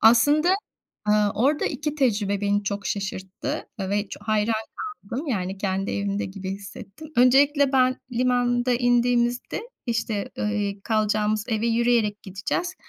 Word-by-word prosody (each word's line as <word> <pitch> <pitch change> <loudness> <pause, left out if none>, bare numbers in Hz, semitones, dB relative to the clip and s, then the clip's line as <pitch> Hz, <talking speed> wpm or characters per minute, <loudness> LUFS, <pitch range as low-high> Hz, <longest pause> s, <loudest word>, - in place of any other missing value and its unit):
Aslında, 290 +10 +5 0.5
ııı, 210 -1 +4
orada 280 +7 +2
2 300 -1 -2
tecrübe 210 -8 +1
beni 205 0 +1
çok 200 0 -3
şaşırttı 190 -1 -4
ve 200 +2 -1
ç - - -7
hayran 215 +1 +1 0.5
kaldım, 255 +10 -5
yani 190 -4 -2
kendi 195 0 -1
evimde 200 0 -1
gibi 190 0 -6
hissettim. 200 +8 -9
Öncelikle 275 +3 +5
ben 255 -1 +3
limanda 245 0 +2
indiğimizde 245 - +1 0.2
işte, 225 -3 -2
iii, 205 -1 -1
kalacağımız 215 -1 +1
eve 225 0 0
yürüyerek 230 -3 +2
gideceğiz. 200 - -3
220 Hz, 125 wpm, -24 LUFS, 200-245 Hz, 0.5 s, Aslında